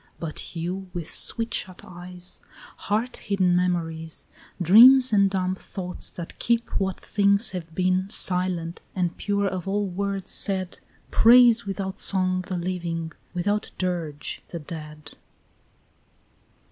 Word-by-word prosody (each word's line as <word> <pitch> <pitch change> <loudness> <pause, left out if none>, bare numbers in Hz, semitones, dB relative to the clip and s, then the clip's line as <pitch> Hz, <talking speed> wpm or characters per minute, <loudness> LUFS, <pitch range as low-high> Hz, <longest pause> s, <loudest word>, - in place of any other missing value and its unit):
But 165 +1 -6
you, 180 +3 -4
with 170 -3 -5
sweet 230 -1 -1
shut 185 -1 -3
eyes, 180 0 -8 0.5
Heart 225 +4 -1
hidden 185 -3 +1
memories, 165 -3 -2 0.3
Dreams 240 +8 +7
and 200 -1 +4
dumb 185 -1 -1
thoughts 185 -1 -6
that 170 -1 -9
keep 235 0 0
what 190 -1 -2
things 200 +1 +2
have 165 -3 -7
been 185 +1 +1
Silent, 180 -4 +1
and 180 -2 -1
pure 200 -1 -1
of 185 -2 -3
all 205 +1 0
words 195 +1 -3
said, 190 -3 +2 0.3
Praise 235 -1 +6
without 195 -1 -4
song 185 -1 +2
the 185 - -3
living, 170 -2 -3 0.2
without 205 +4 -1
dirge 170 -5 -4
the 170 - -7
dead. 150 -1 -9
185 Hz, 125 wpm, -24 LUFS, 175-200 Hz, 0.5 s, Dreams